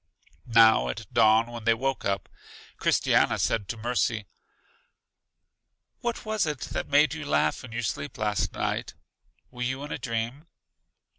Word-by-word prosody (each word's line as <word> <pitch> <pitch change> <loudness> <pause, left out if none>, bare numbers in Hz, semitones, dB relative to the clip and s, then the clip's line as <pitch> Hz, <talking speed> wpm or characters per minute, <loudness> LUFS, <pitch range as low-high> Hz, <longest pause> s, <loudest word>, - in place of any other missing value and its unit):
Now 115 -1 +5
at 110 - -5
dawn 110 +1 +5
when 115 -2 -8
they 115 0 +4
woke 135 +3 -2
up, 100 0 -1 0.5
Christiana - - +2
said 100 -4 0
to 115 - -4
Mercy: 115 -1 -1 1.7
What 235 -1 -3
was 215 -5 0
it 150 -4 -3
that - - -3
made 145 +2 +4
you 160 -1 -5
laugh 75 - +1
in 125 - -10
your 120 +1 -3
sleep 75 -8 -4
last 105 -1 0
night? - - -3 0.6
Were 125 -1 -10
you 130 +3 -2
in 145 - -7
a - - -3
dream? 115 +5 -4
115 Hz, 150 wpm, -27 LUFS, 110-140 Hz, 1.7 s, Now